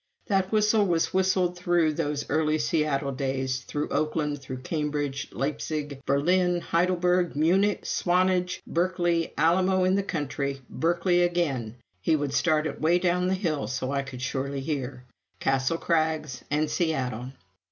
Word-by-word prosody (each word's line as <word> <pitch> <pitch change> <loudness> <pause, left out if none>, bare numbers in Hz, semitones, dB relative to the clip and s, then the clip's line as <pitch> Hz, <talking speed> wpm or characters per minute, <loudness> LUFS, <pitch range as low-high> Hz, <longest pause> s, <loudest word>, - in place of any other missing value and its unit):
That 195 -2 +1
whistle 215 -1 +3
was 170 -2 +1
whistled 185 -1 +2
through 175 -3 +2
those 150 -2 -2
early 155 0 +1
Seattle 150 -3 0
days, 130 -1 -2
through 145 +4 -4
Oakland, 150 -2 -1
through 130 -1 -7
Cambridge, 150 -2 -2
Leipzig, 145 0 -3
Berlin, 175 +5 +2
Heidelberg, 180 0 +1
Munich, 190 +7 +2
Swanage, 180 0 +1
Berkeley, 175 -1 0
Alamo 185 +4 +3
in 185 0 +3
the 200 - +2
country, 140 -6 -3
Berkeley 175 +2 +2
again 145 -11 0 0.3
(he 160 - +2
would 145 -2 -2
start 155 -2 +2
it 150 - -4
way 165 +3 +4
down 180 0 +1
the 190 - +1
hill 165 -7 -1
so 130 0 -3
I 140 -1 0
could 130 -2 -8
surely 135 +1 -2
hear), 135 -3 -4 0.4
Castle 135 +4 +1
Crags, 155 -5 -1
and 150 +1 +1
Seattle. 130 -7 -2
155 Hz, 140 wpm, -27 LUFS, 140-180 Hz, 0.4 s, way